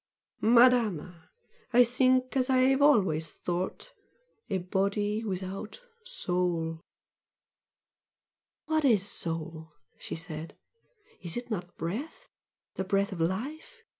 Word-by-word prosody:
"Madama, 220 -8 +3 0.4
I 245 +1 +8
think 255 +1 +2
as 260 0 +1
I 260 - +4 0.2
have 270 - 0
always 185 - +3
thought! 180 +1 -4 0.6
a 195 - 0
body 200 +4 -1
without 195 - -5 0.2
soul!" 175 - 0 1.8
"What 315 0 +1
IS 215 -8 +4
soul?" 160 -3 -4 0.3
she - - -5
said 160 -1 -7 0.6
"Is 175 +1 -5
it 240 0 -6
not 175 -4 -5
breath? 265 - -5 0.5
the 190 - 0
breath 200 +2 0
of 185 - -6
life? 280 - -3
195 Hz, 105 wpm, -29 LUFS, 175-250 Hz, 1.8 s, I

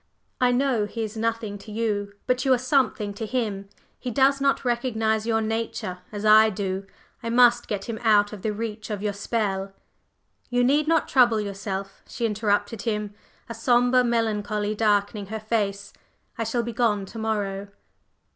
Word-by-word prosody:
"I 250 -1 +4
know 245 -4 +1
he 225 +2 -4
is 215 0 -5
nothing 225 -2 -2
to 210 +2 -11
you; 205 -2 -2
but 250 0 +1
you 270 - +2
are - - -1
something 255 -5 +1
to 220 +2 -5
him. 210 -5 -2 0.3
He 250 - -4
does 275 +3 +3
not 275 -1 +1
recognize 225 -3 0
your 225 -1 +2
nature 220 -4 -3
as 210 0 -5
I 215 +1 +7
do. 195 -1 -3 0.3
I 230 - -4
must 240 0 +5
get 200 -2 -3
him 225 -2 -4
out 210 -3 +4
of 205 - -8
the 215 - -1
reach 220 0 -5
of 210 -1 -4
your 205 -1 0
spell 195 -2 -2 0.4
" - - -43
"You 245 0 +2
need 290 +4 +3
not 325 -1 +2
trouble 240 -4 +4
yourself," 195 -1 -5
she 235 - -3
interrupted 210 0 0
him, 210 -1 -2 0.3
a 230 - -6
sombre 245 +2 +3
melancholy 215 -3 0
darkening 205 -1 +1
her 220 +2 -4
face; 205 -2 -2 0.4
"I 230 - -2
shall 235 +2 0
be 235 0 -5
gone 210 -4 +1
to 225 +4 -9
morrow." 205 -3 -2
220 Hz, 175 wpm, -25 LUFS, 205-235 Hz, 0.4 s, I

